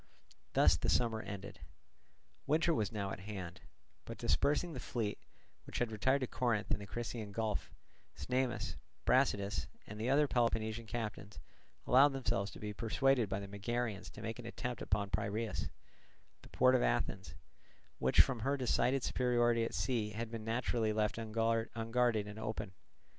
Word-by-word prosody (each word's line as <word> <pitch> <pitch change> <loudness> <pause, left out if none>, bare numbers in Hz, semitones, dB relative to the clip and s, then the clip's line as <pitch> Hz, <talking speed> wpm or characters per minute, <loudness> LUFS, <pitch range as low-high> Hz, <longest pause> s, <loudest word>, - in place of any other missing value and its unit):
Thus - - +5
the - - -1
summer 115 -2 +2
ended. 100 -1 -7 0.9
Winter 160 +3 +3
was 110 -7 0
now 100 -3 -3
at - - -5
hand; 95 -3 -7 0.4
but - - -7
dispersing 145 - +1
the - - -5
fleet, 110 -4 -2 0.5
which - - -5
had 120 -2 0
retired 130 +6 +2
to - - +1
Corinth 115 -5 0
and - - +1
the 100 - -7
Crissaean 115 -1 -4
Gulf, 110 -1 -2 0.5
Cnemus, 110 - -1 0.3
Brasidas, 100 -7 +2 0.2
and 105 +1 -8
the 115 +3 -1
other 145 +2 +4
Peloponnesian 115 -2 0
captains 105 -2 -5 0.5
allowed 135 +3 +6
themselves 110 -7 0
to - - -11
be 105 0 -4
persuaded 115 +2 +2
by 95 0 -1
the 100 - -6
Megarians 105 +1 -3
to - - -9
make 115 +2 -4
an 120 - -7
attempt 120 0 -4
upon 100 0 -1
Piraeus, 110 +2 -1 0.7
the - - -15
port 130 0 +4
of 130 - +4
Athens, - - 0 0.6
which - - +6
from 125 -3 +1
her 135 +5 0
decided 130 0 +2
superiority 120 -2 +2
at 115 - -3
sea 115 -5 0
had 115 +1 -4
been 115 -2 -5
naturally 115 -1 0
left 105 +1 0
unguarded 115 0 +1
and 105 +1 -7
open. 110 -2 -4
115 Hz, 160 wpm, -35 LUFS, 105-125 Hz, 0.9 s, allowed